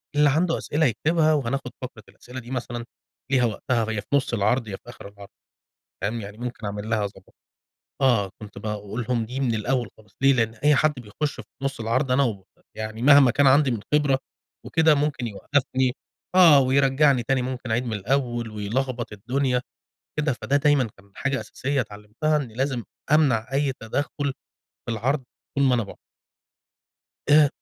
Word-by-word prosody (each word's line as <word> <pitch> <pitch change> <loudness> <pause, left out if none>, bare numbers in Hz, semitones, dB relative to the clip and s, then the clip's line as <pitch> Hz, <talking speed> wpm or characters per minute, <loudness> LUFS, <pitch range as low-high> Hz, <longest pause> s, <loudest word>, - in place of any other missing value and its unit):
اللي 145 0 +5
عنُده 165 +4 +2
أسئلة 155 +2 0
يكتبها، 155 +5 +2
وهناخد 135 -2 -1
فترة 125 -4 -8
الأسئلة 125 +1 -10
دي 120 0 -11
مثلًا 120 -2 -4 0.5
ليها 130 -3 +4
وقتها 115 +1 -1
يا 105 -1 -2
في - - -25
نُصّ 135 -3 0
العرض 110 +3 +1
يا 100 - -4
في 120 - -14
آخر 120 - -10
العرض 100 0 -13 0.7
فاهم؟ 110 +3 -2
يعني 105 +1 -9
ممكن 120 -2 -6
أعملها 105 +1 -2
اضبط 95 -2 -8 0.7
آه، 115 -8 +3
كنت 105 -2 -10
باقول 105 +2 -4
لهم 120 -3 +1
دي 125 +4 -5
من 125 -4 +1
الأول 120 +2 0
خالص، 105 -2 -21
ليه 135 - +6
لإن 115 -3 +1
أي 145 +7 +3
حد 155 +3 +3
بيخُش 125 +6 -3
في - - -12 0.2
نُصّ 135 -3 -2
العرض 125 +4 0
أنا 140 +2 +4
و 100 -6 -3 0.3
يعني 110 +1 -5
مهما 140 -1 +7
كان 145 +3 +3
عندي 135 0 +5
من 115 - -2
خبرة 145 -3 +3 0.5
وكده 160 -1 +4
ممكن 145 -4 -1
يوقّفني 130 +4 0 0.4
آه، 165 -6 +8
ويرجّعني 135 0 +3
تاني 130 +2 +1
ممكن 125 -1 -5
أعيد 120 +3 +1
من 115 - -4
الأول 120 +1 -1
ويلخبّط 120 +3 -3
الدنيا، 125 +4 0 0.6
كده 150 -1 +2
فده 135 +3 0
دايمًا 145 -4 +3
كان 100 +1 -20
حاجة 140 -1 -1
أساسية 140 +1 -2
اتعلِّمتها 105 +8 -2
إني 130 -7 -3
لازم 130 -1 -1 0.3
أمنع 135 -5 +3
أي 140 0 +1
تدخُّل 140 +4 -2 0.5
في - - -3
العرض 130 +5 0 0.3
طول 140 - +3
ما 130 -2 +4
أنا 115 - 0
باعرض. 100 - -11 1.3
آآ 150 0 +7
125 Hz, 170 wpm, -24 LUFS, 110-140 Hz, 1.3 s, آه